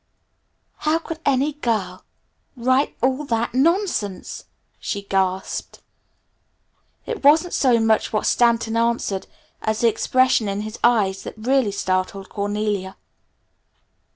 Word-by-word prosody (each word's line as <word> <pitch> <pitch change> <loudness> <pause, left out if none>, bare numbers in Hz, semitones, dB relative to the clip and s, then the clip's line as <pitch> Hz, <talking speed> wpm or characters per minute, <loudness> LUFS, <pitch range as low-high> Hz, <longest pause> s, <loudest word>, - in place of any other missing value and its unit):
"How 310 +1 +1
could 330 -1 -7
any 280 +2 +2
girl 215 -10 -2 0.5
write 255 +3 +1
all 260 +3 +1
that 230 -2 -1
nonsense?" 290 - 0 0.3
she 200 -1 -4
gasped. 190 -1 -2 1.3
It 460 -8 -5
wasn't 315 +5 +5
so 250 -4 +3
much 225 -1 +2
what 215 - -1
Stanton 235 -1 +2
answered, 230 -4 0 0.3
as 220 0 -1
the 235 - +5
expression 255 0 +2
in 200 +1 -2
his 215 +1 -7
eyes 200 -5 +3
that - - -8
really 245 0 +1
startled 190 0 -2
Cornelia. 205 -2 -2
230 Hz, 115 wpm, -22 LUFS, 200-260 Hz, 1.3 s, wasn't